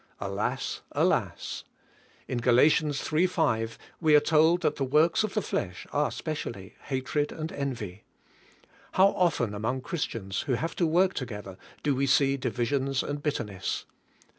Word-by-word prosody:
Alas! - - -2
Alas! - - 0 0.6
In 125 - -2
Gal. 120 0 +4 0.3
3: 155 +5 +1
5 115 -11 0 0.2
we 155 -3 +5
are - - +9
told 160 +3 +4
that - - +1
the 140 - 0
works 155 +10 +3
of 215 -1 -3
the 215 - +1
flesh 90 -1 -3
are 145 0 +2
specially 115 - -5
hatred 140 +2 -1
and 160 0 -5
envy. 115 -9 -4 0.9
How 190 +1 +6
often 165 - +1
among 115 +5 -2
Christians, 115 - -3
who 130 - +2
have 160 +7 -2
to 170 - +2
work 180 +4 +3
together, 105 -7 -6 0.3
do 145 - +2
we 135 +1 +1
see 135 0 +4
divisions 135 +1 0
and 145 0 -4
bitterness! 105 -10 -2
140 Hz, 145 wpm, -28 LUFS, 120-160 Hz, 0.9 s, are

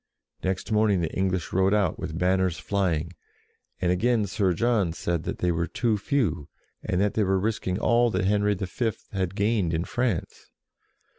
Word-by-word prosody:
" - - -44
Next 95 +3 -2
morning 105 -4 +3
the 80 - -2
English 95 -2 -1
rode 95 +2 +3
out 100 -6 +1
with 80 - -4
banners 90 -1 +1
flying, 90 -4 -1 0.7
and 90 - +1
again 110 +4 +2
Sir 95 -1 +1
John 105 -4 +1
said 85 -1 -2
that - - -3
they 90 - +1
were 85 0 -1
too 115 -3 0
few, 100 - -1 0.3
and 90 - -1
that 100 +1 +2
they 110 - +2
were 95 -1 +2
risking 100 -3 -1
all 120 +2 +3
that 95 -3 -1
Henry 105 +1 +2
V. 105 +4 -2 0.2
had 95 -2 -2
gained 100 -5 +1
in 80 - 0
France. 120 -8 -2
95 Hz, 175 wpm, -26 LUFS, 90-105 Hz, 0.7 s, morning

